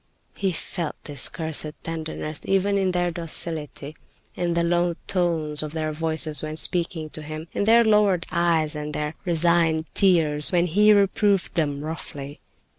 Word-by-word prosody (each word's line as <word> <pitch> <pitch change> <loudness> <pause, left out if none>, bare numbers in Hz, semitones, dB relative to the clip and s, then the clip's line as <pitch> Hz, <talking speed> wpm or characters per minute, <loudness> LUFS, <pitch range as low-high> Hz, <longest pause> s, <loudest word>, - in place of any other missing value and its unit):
He 195 -2 -1
felt 170 -1 -4
this 145 -3 0
cursed 160 -2 -2
tenderness, 160 -2 -5
even 195 +1 +1
in 190 -1 +1
their 175 -1 0
docility, 160 -3 -3 0.4
in 175 -1 -1
the 170 - +2
low 175 0 +1
tones 165 -5 0
of 155 0 -6
their 155 -1 -2
voices 160 -1 -1
when 155 0 -5
speaking 165 -2 0
to 155 - -8
him, 155 +2 -7
in 200 - -1
their 230 +2 +6
lowered 210 -5 +3
eyes, 165 -3 +1
and 150 0 -4
in - - -5
their 150 +1 -2
resigned 165 -2 +2
tears 160 -6 +3
when 175 -1 +3
he 210 +5 +4
reproved 200 -1 +2
them 145 -4 -1
roughly. 145 -3 -7
165 Hz, 160 wpm, -24 LUFS, 155-180 Hz, 0.4 s, their